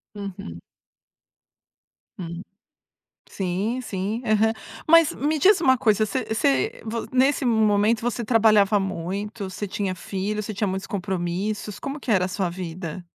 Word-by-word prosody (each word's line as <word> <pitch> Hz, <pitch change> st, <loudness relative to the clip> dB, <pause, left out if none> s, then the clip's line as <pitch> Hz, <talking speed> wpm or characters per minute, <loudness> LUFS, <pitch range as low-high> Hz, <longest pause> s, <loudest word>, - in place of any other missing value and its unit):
Uhum. 185 Hz, -, -7 dB, 1.6 s
Hum. 170 Hz, 0 st, -6 dB, 0.9 s
Sim 195 Hz, +6 st, -2 dB
sim, 210 Hz, +2 st, -3 dB
aham, 220 Hz, 0 st, +3 dB, 0.3 s
mas 330 Hz, -1 st, +6 dB
me 305 Hz, +2 st, 0 dB
diz 375 Hz, +4 st, +5 dB
uma 260 Hz, -4 st, +4 dB
coisa, 215 Hz, -2 st, +3 dB
você 205 Hz, -, -2 dB
você 140 Hz, -12 st, 0 dB
vo 230 Hz, +1 st, -4 dB
nesse 265 Hz, +1 st, +3 dB
momento 220 Hz, -1 st, +3 dB
você 240 Hz, 0 st, -2 dB
trabalhava 215 Hz, -3 st, +4 dB
muito, 195 Hz, +3 st, -4 dB
você 205 Hz, +2 st, -4 dB
tinha 190 Hz, -1 st, -2 dB
filho, 200 Hz, +3 st, -3 dB
você 215 Hz, -, -5 dB
tinha 205 Hz, +1 st, -1 dB
muitos 190 Hz, +1 st, -3 dB
compromissos, 195 Hz, +2 st, -3 dB
como 280 Hz, +2 st, -5 dB
que 255 Hz, -, -8 dB
era 190 Hz, -4 st, +3 dB
a -, -, -2 dB
sua 185 Hz, -1 st, -2 dB
vida? 175 Hz, 0 st, -6 dB
205 Hz, 140 wpm, -24 LUFS, 190-225 Hz, 1.6 s, mas